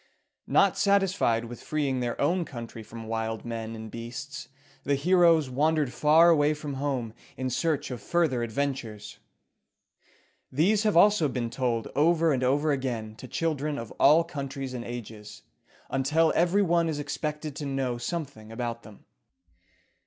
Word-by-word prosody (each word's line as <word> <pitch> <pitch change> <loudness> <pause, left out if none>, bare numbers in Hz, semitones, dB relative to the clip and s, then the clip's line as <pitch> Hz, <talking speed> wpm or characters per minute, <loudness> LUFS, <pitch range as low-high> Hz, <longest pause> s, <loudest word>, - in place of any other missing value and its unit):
Not - - +3
satisfied 195 - +2
with 120 +1 -9
freeing 140 -4 -1
their 120 -1 -3
own 175 +5 +2
country 120 -6 -8
from 115 +1 -9
wild 110 0 -3
men 115 -1 -5
and 110 -1 -8
beasts, 125 +5 -7 0.4
the 140 - +1
heroes 165 0 +4
wandered 145 +1 +1
far 160 +3 +5
away 150 -1 +3
from 150 -1 -6
home 130 -6 -2 0.2
in 130 0 -2
search 145 +1 -1
of 120 -4 -6
further 155 -4 +1
adventures. 115 -3 -4 1.3
These 190 +10 +3
have 215 -5 +2
also 205 -3 +5
been 120 -3 -3
told 120 -4 -1
over 165 +1 +3
and 130 -1 -1
over 145 +4 +2
again 120 -6 -3
to 130 - -9
children 150 -1 -2
of 115 -5 -7
all 155 +4 +6
countries 140 -4 -5
and 120 -2 -5
ages, 110 -3 -8 0.5
until 150 +5 +2
every 180 +4 +3
one 170 -2 +2
is 155 - -2
expected 150 0 -4
to 145 - -4
know 130 -3 -2
something 135 -7 -5
about 115 0 -4
them. 105 -1 -15
140 Hz, 150 wpm, -27 LUFS, 120-160 Hz, 1.3 s, all